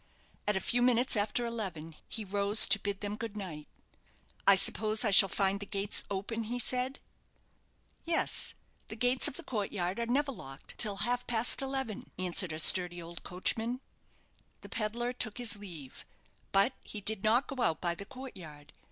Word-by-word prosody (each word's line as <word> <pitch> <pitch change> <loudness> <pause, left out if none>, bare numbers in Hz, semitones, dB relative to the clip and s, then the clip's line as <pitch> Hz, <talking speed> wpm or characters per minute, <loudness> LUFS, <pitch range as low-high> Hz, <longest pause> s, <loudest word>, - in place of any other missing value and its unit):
At 210 - +1
a - - +1
few 245 +5 0
minutes 245 +1 +3
after 210 +3 0
eleven 185 -9 -6
he 220 -2 -6
rose 200 +2 +3
to 200 - +4
bid 200 0 -4
them 205 0 -4
good 220 -1 -7
night. 165 -7 -7 0.8
"I 200 - +8
suppose 215 +3 +5
I 210 - +2
shall 195 0 +8
find 195 0 0
the 205 - -8
gates 200 +1 -1
open?" 205 +3 -4
he 240 +3 -4
said. 250 +2 -1 1.0
"Yes; 335 0 +2 0.3
the - - -8
gates 245 +3 +3
of - - -4
the - - -7
court 210 -5 -3
yard 185 +1 -3
are 235 - -2
never 275 +4 0
locked 135 - -10
till 210 -3 +5
half 245 0 -1
past 235 +2 +3
eleven," 265 -5 -4
answered 185 -1 +1
a 155 - -5
sturdy 175 +2 +5
old 170 0 -8
coachman. 225 +7 -2 0.8
The - - -12
pedlar 240 +3 -2
took 220 -3 -3
his 230 -4 -2
leave; 170 -10 -10 0.5
but 200 +7 +3
he 210 - -8
did 210 0 0
not 230 +5 +3
go 270 -2 -6
out 160 -7 +1
by 175 -1 0
the 200 +4 -8
court 260 +2 -10
yard. 150 -4 -12
210 Hz, 180 wpm, -31 LUFS, 190-240 Hz, 1.0 s, I